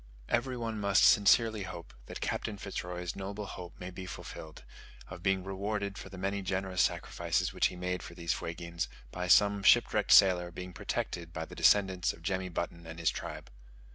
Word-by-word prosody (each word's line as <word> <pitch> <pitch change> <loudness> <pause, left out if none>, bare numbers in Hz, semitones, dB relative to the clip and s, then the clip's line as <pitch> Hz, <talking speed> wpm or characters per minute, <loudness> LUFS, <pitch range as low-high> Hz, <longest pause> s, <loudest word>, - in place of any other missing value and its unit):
Every 125 +1 0
one 115 -2 -3
must 100 -1 +3
sincerely 110 +1 +5
hope 95 -3 -8
that - - -7
Captain 105 - -2
Fitz 100 0 -5
Roy's 90 -1 -5
noble 100 +2 -5
hope 90 -2 -9
may 90 +1 -6
be 95 0 -8
fulfilled, 80 -4 -9 0.5
of 90 -1 -9
being 95 0 +1
rewarded 100 +1 -3
for 95 - -8
the 95 - -10
many 100 +2 -2
generous 95 0 -1
sacrifices - - 0
which - - +3
he - - -8
made 90 0 -3
for 85 - -10
these 85 -2 -1
Fuegians, 85 0 -4 0.2
by 90 0 -3
some 100 +2 +5
shipwrecked 95 - +4
sailor 90 -2 +7
being 90 +1 -8
protected 85 -1 -3
by 80 0 -4
the - - -13
descendants 95 -3 +3
of 80 - -16
Jemmy 95 0 -1
Button 85 -1 -4
and 80 0 -8
his 85 -2 +2
tribe! - - -7
95 Hz, 185 wpm, -31 LUFS, 90-100 Hz, 0.5 s, sailor